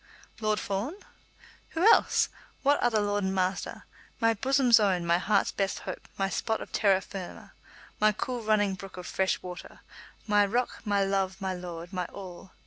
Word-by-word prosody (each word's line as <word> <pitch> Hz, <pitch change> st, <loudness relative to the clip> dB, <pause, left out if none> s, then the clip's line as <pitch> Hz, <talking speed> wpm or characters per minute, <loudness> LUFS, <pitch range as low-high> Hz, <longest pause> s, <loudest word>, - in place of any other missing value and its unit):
"Lord 215 Hz, -1 st, +1 dB
Fawn?" 205 Hz, -, -3 dB, 0.8 s
"Who -, -, +1 dB
else? -, -, +3 dB, 0.3 s
What 285 Hz, +1 st, +4 dB
other 225 Hz, -3 st, +2 dB
lord 205 Hz, 0 st, 0 dB
and 190 Hz, 0 st, -1 dB
master? 185 Hz, 0 st, -2 dB, 0.3 s
My 230 Hz, -1 st, +4 dB
bosom's 255 Hz, 0 st, +4 dB
own; 185 Hz, -4 st, +1 dB
my 170 Hz, +1 st, +3 dB
heart's 200 Hz, +1 st, +2 dB
best 195 Hz, -1 st, -1 dB
hope; -, -, -7 dB
my 195 Hz, -, +1 dB
spot 220 Hz, +3 st, -1 dB
of -, -, -9 dB
terra 195 Hz, -3 st, +3 dB
firma; 190 Hz, -2 st, -8 dB, 0.5 s
my 215 Hz, 0 st, +5 dB
cool 245 Hz, +3 st, -3 dB
running 210 Hz, -2 st, +2 dB
brook 190 Hz, 0 st, -9 dB
of 180 Hz, -, -7 dB
fresh 190 Hz, +1 st, 0 dB
water; 180 Hz, 0 st, -9 dB, 0.4 s
my 210 Hz, -1 st, +4 dB
rock; 240 Hz, +5 st, -1 dB
my 200 Hz, -1 st, +2 dB
love; 195 Hz, 0 st, -1 dB
my 190 Hz, -2 st, -2 dB
lord; 175 Hz, -1 st, -7 dB
my 180 Hz, -1 st, -1 dB
all! 185 Hz, 0 st, -10 dB
200 Hz, 170 wpm, -28 LUFS, 190-215 Hz, 0.8 s, my